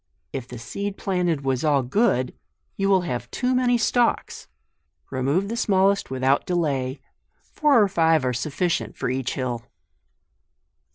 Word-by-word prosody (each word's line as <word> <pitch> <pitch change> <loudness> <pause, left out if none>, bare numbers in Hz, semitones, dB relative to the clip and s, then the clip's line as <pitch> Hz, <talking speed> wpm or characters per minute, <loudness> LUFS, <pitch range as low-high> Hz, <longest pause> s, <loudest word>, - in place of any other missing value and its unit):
If 130 -2 -5
the 125 - -8
seed 200 - -5
planted 180 -6 0
was 130 0 0
all 145 -3 +3
good, 130 - +1 0.4
you 195 0 0
will 190 -2 +4
have 125 -8 -4
too 255 0 -1
many 250 -1 +3
stalks; 235 +1 0 0.6
remove 140 +9 0
the 230 - -3
smallest 200 -3 +2
without 130 +1 +1
delay; 140 -7 -1 0.5
four 295 -5 +4
or 205 - +5
five 165 -6 +2
are 125 - 0
sufficient 135 - -2
for - - -1
each 130 -1 -2
hill. 125 -3 -2
160 Hz, 140 wpm, -24 LUFS, 130-200 Hz, 0.6 s, or